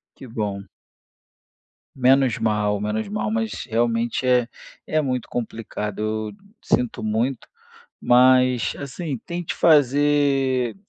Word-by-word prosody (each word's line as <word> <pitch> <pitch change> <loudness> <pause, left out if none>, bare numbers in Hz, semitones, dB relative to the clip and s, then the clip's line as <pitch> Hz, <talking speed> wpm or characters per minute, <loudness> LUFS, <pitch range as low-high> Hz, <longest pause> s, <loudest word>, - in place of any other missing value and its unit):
Que 130 - -11
bom. 105 -4 -4 1.3
Menos 130 -1 +3
mal, 105 -2 0
menos 105 +1 -2
mal. 105 +1 -2
Mas 110 -1 -2
realmente 115 +2 0
é 125 -2 +3 0.4
é 155 - +1
muito 130 -4 -2
complicado. 110 -3 -5
Eu 110 0 -2 0.3
sinto 125 -3 -1
muito, 115 +4 -1 0.5
mas 125 -1 +4
assim 140 +1 -5
tente 175 -1 -4
fazer 140 -4 +3
120 Hz, 105 wpm, -22 LUFS, 110-135 Hz, 1.3 s, mas